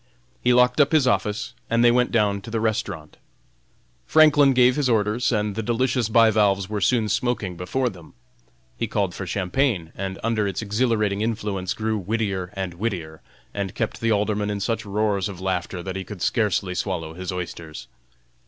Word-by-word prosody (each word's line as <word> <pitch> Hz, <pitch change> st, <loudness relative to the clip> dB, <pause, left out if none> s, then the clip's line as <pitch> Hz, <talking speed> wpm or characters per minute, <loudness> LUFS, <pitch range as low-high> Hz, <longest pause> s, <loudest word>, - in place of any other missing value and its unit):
He 125 Hz, -, +3 dB
locked 125 Hz, +4 st, +4 dB
up 145 Hz, +2 st, +2 dB
his 155 Hz, -4 st, +4 dB
office, 105 Hz, -4 st, 0 dB, 0.2 s
and 115 Hz, +1 st, +3 dB
they 120 Hz, -, +7 dB
went 125 Hz, 0 st, +2 dB
down 105 Hz, -3 st, +1 dB
to 95 Hz, -, -9 dB
the 115 Hz, 0 st, -1 dB
restaurant. 105 Hz, -8 st, -3 dB, 0.9 s
Franklin 145 Hz, -3 st, +6 dB
gave 125 Hz, 0 st, +5 dB
his 145 Hz, -4 st, +1 dB
orders, 110 Hz, +1 st, +1 dB
and 105 Hz, -2 st, 0 dB
the 110 Hz, -, -3 dB
delicious 120 Hz, +1 st, 0 dB
bivalves 105 Hz, -4 st, +4 dB
were 105 Hz, 0 st, -3 dB
soon 115 Hz, +2 st, +2 dB
smoking 110 Hz, -4 st, -1 dB
before 110 Hz, +10 st, -1 dB
them. 90 Hz, -8 st, -9 dB, 0.6 s
He -, -, -2 dB
called 100 Hz, -3 st, -1 dB
for 95 Hz, -, -6 dB
champagne, 95 Hz, -, 0 dB
and 95 Hz, 0 st, -4 dB
under 110 Hz, -2 st, +1 dB
its 95 Hz, +2 st, -3 dB
exhilarating 105 Hz, -2 st, 0 dB
influence 105 Hz, -4 st, -2 dB
grew 110 Hz, -1 st, -1 dB
wittier 100 Hz, -2 st, -2 dB
and 95 Hz, -2 st, -3 dB
wittier, 85 Hz, -5 st, -4 dB, 0.3 s
and 100 Hz, -2 st, -4 dB
kept 115 Hz, -, -3 dB
the 115 Hz, 0 st, +1 dB
Alderman 105 Hz, 0 st, 0 dB
in 105 Hz, -1 st, -2 dB
such 110 Hz, +1 st, -2 dB
roars 100 Hz, -1 st, 0 dB
of 95 Hz, -3 st, -8 dB
laughter 95 Hz, -1 st, -3 dB
that 95 Hz, 0 st, -5 dB
he 95 Hz, -, -3 dB
could 100 Hz, -2 st, -7 dB
scarcely 100 Hz, -4 st, +1 dB
swallow 90 Hz, -4 st, -3 dB
his 90 Hz, +2 st, -5 dB
oysters. 85 Hz, -3 st, -6 dB
105 Hz, 175 wpm, -23 LUFS, 95-115 Hz, 0.9 s, they